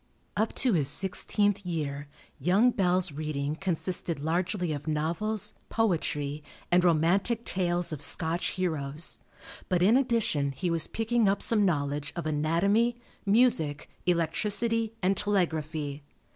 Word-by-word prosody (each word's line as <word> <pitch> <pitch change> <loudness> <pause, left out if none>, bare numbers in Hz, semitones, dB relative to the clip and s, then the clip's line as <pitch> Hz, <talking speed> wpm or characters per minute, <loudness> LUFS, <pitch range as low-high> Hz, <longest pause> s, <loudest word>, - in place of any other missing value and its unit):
Up 220 +2 -1
to 255 -4 +2
his 150 -6 +4
sixteenth 200 +5 +2
year 145 -5 -4 0.3
young 195 - +3
Bell's 185 -4 +1
reading 150 0 -3
consisted 175 -2 -2
largely 175 +2 -1
of 145 +1 -7
novels, 165 +8 -1 0.2
poetry, 155 -9 -1 0.3
and 175 0 +4
romantic 180 +8 +2
tales 175 -2 0
of 150 - -6
Scotch 165 +3 +1
heroes. 155 -4 -1 0.5
But 180 -1 +2
in 215 +6 +5
addition 230 - +1
he 175 +5 -2
was 165 -1 +1
picking 225 -1 +1
up 200 - +1
some 210 -3 +3
knowledge 145 -4 -1
of 170 - -4
anatomy, 175 +10 +1 0.3
music, 195 - +2 0.2
electricity, 210 +7 +1
and 190 +2 +3
telegraphy. 155 -7 -1
175 Hz, 125 wpm, -28 LUFS, 155-205 Hz, 0.5 s, in